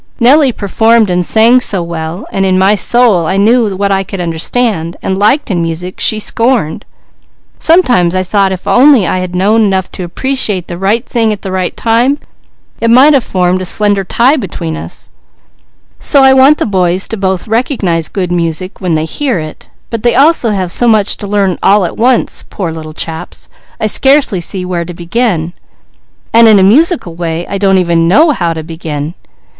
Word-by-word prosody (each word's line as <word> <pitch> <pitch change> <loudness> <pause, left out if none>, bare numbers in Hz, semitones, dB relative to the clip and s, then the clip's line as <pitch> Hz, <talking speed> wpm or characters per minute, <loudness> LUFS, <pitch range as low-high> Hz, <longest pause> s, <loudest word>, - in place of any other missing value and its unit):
Nellie 265 +3 +4
performed 220 0 +1
and 180 0 0
sang 225 +7 +3
so 195 -7 -2
well, 170 +3 -6
and 195 - -1
in 190 -1 +1
my 190 +2 +3
soul 210 -4 +2
I 190 - -1
knew 215 0 +2
what 200 0 -1
I 195 0 +1
could 195 0 -8
understand 170 +1 -2
and 190 - -1
liked 215 +6 +1
in 175 -3 -1
music 165 +2 -5
she 215 - 0
scorned. 225 -7 -1 0.7
Sometimes 245 - +3
I 185 - 0
thought 195 +1 0
if 185 -1 -6
I - - +2 0.4
had 180 -1 -5
known 200 +4 +1
only 220 -2 +3
enough 190 -1 -2
to 185 - -7
appreciate 205 -1 -2
the 175 -1 -7
right 215 +6 0
thing 225 -3 0
at 210 - -6
the 190 - -5
right 185 -1 -3
time, 235 +5 +1 0.6
it 230 - 0
might 265 +6 +5
have 270 -4 +2
formed 185 -1 -1
a - - -4
slender 205 -1 +1
tie 250 - +1
between 170 - -5
us; - - -8 0.9
so 280 -3 +2
I 265 0 +6
want 270 +3 +5
the - - -1
boys 185 -2 0
both 190 -4 -2
to 220 - -14
recognize 205 - -1
good 180 -3 -3
music 175 +2 -2
when 180 -3 -1
they 155 0 -1
hear 260 - -2
it; 155 -1 -9 0.2
but 230 -2 -4
they 240 +1 +1
have 225 - +1
so 240 - +3
much 215 -3 +3
to 205 - -7
learn 200 -3 -1
all 200 -1 +3
at - - -5
once, 245 +1 0
poor 180 -5 -4
little 155 -1 -9
chaps, 160 +1 -6 0.3
I - - -1
scarcely 265 -3 +2
see 185 +2 -4
where 175 -2 -3
to 175 0 -9
begin, 175 -2 -2 0.8
and 230 0 +6
in 215 -2 +6
a 190 - +3
musical 265 - +2
way, 170 0 -4
I 200 - -5
don't 195 -1 +2
even 170 -2 +1
know 300 - +4
how 170 - -2
to 160 - -6
begin. 160 -1 -6
195 Hz, 190 wpm, -11 LUFS, 175-230 Hz, 0.9 s, I